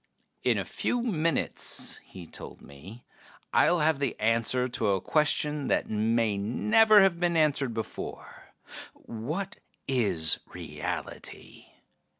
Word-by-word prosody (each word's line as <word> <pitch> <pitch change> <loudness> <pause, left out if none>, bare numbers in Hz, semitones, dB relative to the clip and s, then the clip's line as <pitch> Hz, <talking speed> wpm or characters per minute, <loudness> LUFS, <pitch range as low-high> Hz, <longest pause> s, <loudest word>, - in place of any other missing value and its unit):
"In - - +2
a - - -2
few 245 -1 -2
minutes," 165 - 0
he 90 -3 -11
told - - -10
me, 85 - -13 0.5
"I'll 175 -2 +4
have 155 -2 +2
the 140 - -2
answer 115 +3 +1
to 125 -3 -2
a 100 -1 +2
question 150 - +1
that - - 0
may 110 -1 +1
never 215 - +5
have 180 -3 +2
been 175 -1 +1
answered 145 -6 +1
before: 110 - -7 0.4
what 155 - -6 0.3
is 100 -12 +2
reality? - - -7
130 Hz, 120 wpm, -28 LUFS, 110-165 Hz, 0.5 s, never